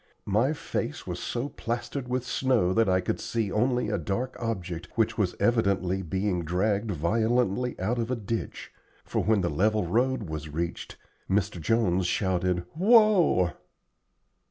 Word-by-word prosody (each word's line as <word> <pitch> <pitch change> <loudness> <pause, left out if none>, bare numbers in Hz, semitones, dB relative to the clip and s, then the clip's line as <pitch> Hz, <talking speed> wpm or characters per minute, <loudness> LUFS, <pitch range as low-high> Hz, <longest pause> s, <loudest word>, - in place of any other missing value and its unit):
My 110 +8 +2
face 155 - -4
was - - -4
so 120 +3 -3
plastered 120 +2 -4
with 125 0 -2
snow 125 -10 +1
that 115 -1 +3
I 95 0 +3
could - - -2
see 110 -4 -2
only 125 +1 +1
a 105 -2 -1
dark 120 +11 -3
object 90 -7 -4
which 115 0 +1
was 100 -5 0
evidently 100 -5 +1
being 95 +1 -1
dragged 100 +6 0
violently 110 +7 0
out 110 +7 -1
of 115 0 -2
a 130 - 0
ditch, 115 0 -5 0.3
for - - -1
when 110 -2 +3
the 85 - 0
level 105 +5 +1
road 125 +7 +1
was 80 -3 -6
reached, 85 +3 -4 0.3
Mr. 95 -2 0
Jones 95 -1 +2
shouted, 90 -2 0
"Whoa!" 195 - +5
105 Hz, 150 wpm, -27 LUFS, 90-120 Hz, 0.3 s, Whoa